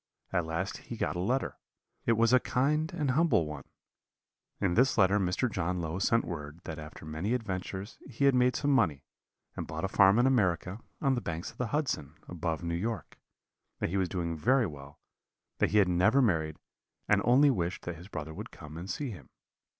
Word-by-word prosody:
At 90 -3 +1
last 80 +1 -2
he - - -8
got - - -1
a - - -2
letter; 125 +9 -1 0.5
it 115 - +5
was 115 +2 +3
a 130 - +7
kind 150 +6 +1
and 145 -4 0
humble 155 - +3
one: 75 -3 -7 0.9
in 95 -4 +1
this 125 +6 +3
letter 100 0 +4
Mr. 95 +6 +1
John 90 -4 -2
Low 85 +2 -3
sent 115 +4 +2
word, 75 -2 -6
that 80 -1 -6
after 75 0 -10
many 80 +10 -1
adventures 95 -2 -5
he 140 - 0
had 140 - +6
made 125 0 +3
some 145 - +1
money, 90 - +2 0.5
and - - -5
bought - - -5
a - - +2
farm 95 +1 +5
in 120 - +4
America, 95 -6 +1 0.2
on 135 -2 +3
the 125 - -1
banks 85 -2 -4
of - - -24
the 125 - 0
Hudson, 110 - -2
above 80 -2 -3
New 85 0 -2
York; 110 +6 -4 0.6
that - - -1
he 100 - 0
was 95 -2 +1
doing 85 -3 -2
very 120 - +3
well, 70 -3 -9 0.6
that - - +3
he 105 - +2
had 100 -3 +5
never 90 +9 +4
married, 80 - +1 0.5
and - - +4
only 135 +4 +5
wished 90 -6 -2
that 85 -1 -5
his 85 +3 -11
brother 80 -5 -6
would - - -7
come 75 +1 -11
and 90 +3 -7
see 135 +7 -3
him. 75 -11 -11
95 Hz, 205 wpm, -30 LUFS, 85-125 Hz, 0.9 s, a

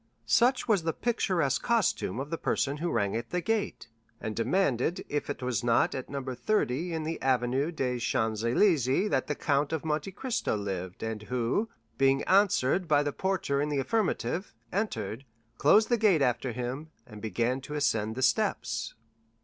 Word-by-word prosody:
Such 240 - +3
was 210 -6 +3
the 165 0 -1
picturesque 180 - 0
costume 230 - +1
of 140 +3 -5
the 165 - -1
person 140 +1 0
who 170 +3 -2
rang 100 -6 0
at 115 +1 -4
the 180 - -1
gate, 220 - -2 0.3
and 110 -1 -4
demanded 140 +3 0
if 145 0 -2
it 145 - -4
was 125 -5 -1
not 120 -1 +3
at 130 - -5
No. 140 -1 -4
30 135 - -1
in 160 -1 -2
the 160 +1 -4
Avenue 130 +3 +1
des 125 -6 -2
Champs 110 -2 0
Élysées 140 - +2
that - - +1
the 150 - -1
Count 140 +1 0
of 160 -1 -2
Monte 155 +4 -1
Cristo 235 - -2
lived, 95 -3 -5
and 110 -1 -3
who, 125 - -1 0.3
being 135 0 +3
answered 185 -4 +3
by 145 -1 +4
the 145 -1 -2
porter 185 -7 0
in 150 - -1
the 145 - -1
affirmative, 175 - -1 0.2
entered, 120 - -2 0.4
closed 210 +9 +5
the 240 - +3
gate 200 -9 +4
after 125 0 0
him, 125 +6 -4 0.2
and 105 -4 -11
began 120 +4 -1
to 150 +3 -7
ascend 110 -7 0
the 130 - -2
steps. 115 -3 0
140 Hz, 175 wpm, -29 LUFS, 120-175 Hz, 0.4 s, closed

